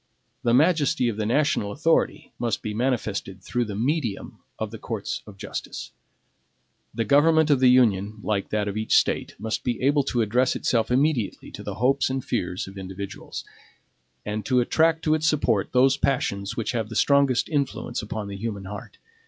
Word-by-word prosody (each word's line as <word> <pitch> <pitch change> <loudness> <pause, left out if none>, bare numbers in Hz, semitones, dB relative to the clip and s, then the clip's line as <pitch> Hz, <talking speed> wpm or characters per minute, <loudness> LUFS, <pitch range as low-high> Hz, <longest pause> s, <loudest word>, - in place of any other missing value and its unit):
The 120 0 +3
majesty 145 -4 +3
of 110 - -4
the 105 -1 -1
national 120 -5 +1
authority 160 +6 0
must 115 -4 -1
be 110 - -3
manifested 110 -6 -2
through 120 0 -1
the 105 -2 -5
medium 125 -1 -2 0.2
of 110 -1 -4
the 115 - -8
courts 110 -4 -4
of 100 -2 -12
justice. - - -6 1.0
The 115 0 -2
government 155 +5 +4
of 140 - +4
the 130 -1 +6
Union, 110 -5 +3
like 100 -2 -1
that 105 -1 -1
of 100 - -3
each 110 0 +2
State, - - 0
must 110 +2 -3
be 120 -2 -1
able 145 +2 +3
to 120 -4 +1
address 125 +5 +2
itself 115 -3 +1
immediately 130 -4 0
to - - -8
the - - -5
hopes 135 +4 +2
and 130 -1 -3
fears 90 -6 -2
of 95 0 -9
individuals; 95 +1 -7 0.8
and 105 0 -3
to 130 -1 +3
attract 160 +6 +2
to 155 - +3
its 155 0 +1
support 125 -10 +1
those 135 +2 +4
passions 110 -7 -1
which 115 - -1
have 115 -4 -2
the 110 - -7
strongest 140 -2 +3
influence 140 -5 -2
upon 105 -1 -5
the 100 0 -6
human 100 -2 -4
heart. 100 +1 -8
120 Hz, 180 wpm, -25 LUFS, 105-135 Hz, 1.0 s, the